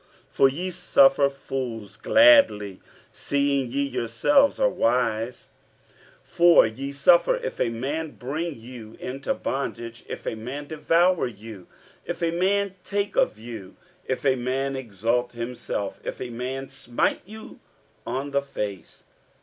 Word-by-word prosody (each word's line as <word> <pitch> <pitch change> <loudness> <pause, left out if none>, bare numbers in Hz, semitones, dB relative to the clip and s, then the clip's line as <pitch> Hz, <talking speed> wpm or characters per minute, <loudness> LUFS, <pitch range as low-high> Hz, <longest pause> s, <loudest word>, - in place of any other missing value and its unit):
47:011:019 - - -36
For 135 - +4
ye 175 +7 -4
suffer 185 - +4
fools 125 -7 -6
gladly, 275 - +5 0.3
seeing 140 -2 0
ye 140 +3 0
yourselves 140 - +2
are - - +4
wise. 120 - -1 0.7
47:011:020 - - -25
For 175 0 +7
ye 130 +6 -5
suffer, 170 - +4
if - - -5
a - - +2
man 145 +7 -3
bring 150 +2 -4
you 115 -2 -11
into 135 - -3
bondage, 120 -3 -4
if - - -7
a - - -2
man 125 +7 -6
devour 165 +2 +2
you, 110 -4 -11 0.4
if - - -5
a 165 - +2
man 195 +3 +1
take 200 0 -2
of - - +2
you, 110 -4 -9 0.3
if 130 +2 -3
a 135 -1 +4
man 130 +2 -2
exalt 120 0 -1
himself, 120 -4 -4
if - - -5
a 125 -1 -5
man 130 +3 -4
smite 125 -3 -1
you 220 +1 -11 0.4
on 135 +4 -4
the 140 0 +1
face. 105 - -6
135 Hz, 140 wpm, -25 LUFS, 115-165 Hz, 0.7 s, For